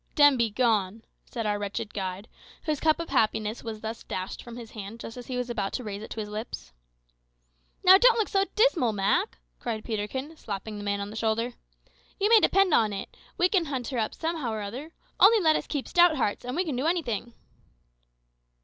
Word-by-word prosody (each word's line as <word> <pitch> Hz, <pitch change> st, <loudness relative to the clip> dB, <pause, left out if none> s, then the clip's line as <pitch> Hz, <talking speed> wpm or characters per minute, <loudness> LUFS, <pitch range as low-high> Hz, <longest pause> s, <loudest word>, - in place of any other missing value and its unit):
"Dem 290 Hz, -2 st, +7 dB
be 235 Hz, -2 st, +1 dB
gone," 220 Hz, -2 st, +1 dB, 0.2 s
said 230 Hz, -3 st, -5 dB
our 205 Hz, -1 st, 0 dB
wretched 205 Hz, +1 st, -4 dB
guide, 190 Hz, +1 st, -4 dB, 0.4 s
whose 305 Hz, -3 st, -1 dB
cup 315 Hz, 0 st, +2 dB
of 335 Hz, -, -5 dB
happiness 220 Hz, 0 st, 0 dB
was 220 Hz, -2 st, -6 dB
thus 225 Hz, +1 st, -5 dB
dashed 185 Hz, 0 st, -5 dB
from 240 Hz, 0 st, -10 dB
his 230 Hz, -2 st, -9 dB
hand 215 Hz, +1 st, -8 dB
just 225 Hz, -, -8 dB
as 245 Hz, -1 st, -9 dB
he 255 Hz, -, -3 dB
was 250 Hz, -1 st, -2 dB
about 215 Hz, -5 st, -3 dB
to 255 Hz, -, -3 dB
raise 205 Hz, -2 st, -5 dB
it 220 Hz, -, -8 dB
to -, -, -6 dB
his 210 Hz, -, -3 dB
lips. 215 Hz, -, -7 dB, 1.1 s
"Now, 380 Hz, +1 st, +9 dB
don't 485 Hz, 0 st, +6 dB
look 440 Hz, -, +1 dB
so 390 Hz, 0 st, +2 dB
dismal, 360 Hz, -, +3 dB
Mak," 205 Hz, -, +1 dB, 0.2 s
cried 220 Hz, -3 st, -4 dB
Peterkin, 245 Hz, +8 st, -4 dB
slapping 210 Hz, -4 st, -6 dB
the -, -, -6 dB
man 200 Hz, 0 st, -1 dB
on 200 Hz, +1 st, -5 dB
the -, -, -9 dB
shoulder. 225 Hz, +2 st, 0 dB, 0.7 s
"You 405 Hz, +2 st, +2 dB
may 455 Hz, -1 st, +8 dB
depend 390 Hz, -4 st, +3 dB
upon 215 Hz, -6 st, +3 dB
it, 195 Hz, -, -6 dB, 0.2 s
we 355 Hz, -, +4 dB
will 360 Hz, -4 st, +3 dB
hunt 260 Hz, -5 st, -3 dB
her 255 Hz, -, -2 dB
up 215 Hz, -, -2 dB
somehow 320 Hz, -7 st, -2 dB
or 215 Hz, -1 st, -3 dB
other. 255 Hz, +11 st, -7 dB, 0.3 s
Only 435 Hz, +3 st, +7 dB
let 315 Hz, -4 st, +4 dB
us -, -, -2 dB
keep 285 Hz, -3 st, -3 dB
stout 350 Hz, -2 st, +5 dB
hearts, 210 Hz, -5 st, -1 dB
and 250 Hz, +2 st, -3 dB
we 365 Hz, +3 st, 0 dB
can 300 Hz, -6 st, -2 dB
do 260 Hz, +5 st, 0 dB
anything." 240 Hz, -, -1 dB
235 Hz, 210 wpm, -27 LUFS, 210-315 Hz, 1.1 s, Now